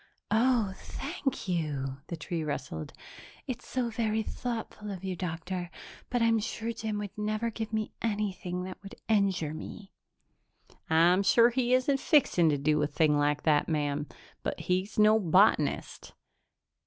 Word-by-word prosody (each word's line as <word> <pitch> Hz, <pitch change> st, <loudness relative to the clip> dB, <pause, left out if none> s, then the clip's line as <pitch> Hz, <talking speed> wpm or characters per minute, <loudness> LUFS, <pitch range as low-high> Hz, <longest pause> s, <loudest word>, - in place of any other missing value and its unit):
"Oh, 225 Hz, -3 st, +3 dB
thank 275 Hz, -, -4 dB
you!" 145 Hz, -6 st, -2 dB
the 170 Hz, -, -5 dB
tree 160 Hz, +1 st, -3 dB
rustled. 130 Hz, -, -4 dB, 0.5 s
"It's 250 Hz, -1 st, -6 dB
so 245 Hz, -2 st, -1 dB
very 220 Hz, -1 st, 0 dB
thoughtful 225 Hz, -3 st, -5 dB
of 190 Hz, -2 st, -6 dB
you, 190 Hz, -1 st, -2 dB
Doctor, 175 Hz, +1 st, -4 dB, 0.4 s
but 245 Hz, -2 st, +1 dB
I'm 230 Hz, -1 st, +4 dB
sure 230 Hz, +2 st, -3 dB
Jim 220 Hz, -2 st, -3 dB
would 205 Hz, -1 st, -5 dB
never 215 Hz, +2 st, -1 dB
give 220 Hz, 0 st, -5 dB
me 220 Hz, -1 st, -2 dB
anything 195 Hz, -5 st, -2 dB
that 185 Hz, 0 st, -8 dB
would 195 Hz, 0 st, -10 dB
injure 195 Hz, -8 st, +1 dB
me." 195 Hz, +5 st, -8 dB, 1.0 s
"I'm 170 Hz, +4 st, +5 dB
sure 230 Hz, +4 st, +5 dB
he 250 Hz, 0 st, +2 dB
isn't 270 Hz, +2 st, +2 dB
fixing 185 Hz, -, +4 dB
to 145 Hz, -, +2 dB
do 150 Hz, +2 st, +2 dB
a 150 Hz, -, +2 dB
thing 150 Hz, 0 st, +2 dB
like 145 Hz, 0 st, +1 dB
that, 150 Hz, -1 st, +3 dB
ma'am, 145 Hz, -1 st, -1 dB, 0.3 s
but -, -, -3 dB
he's 185 Hz, +4 st, -1 dB
no 215 Hz, +1 st, +6 dB
botanist." 180 Hz, -4 st, +2 dB
195 Hz, 150 wpm, -29 LUFS, 160-225 Hz, 1.0 s, no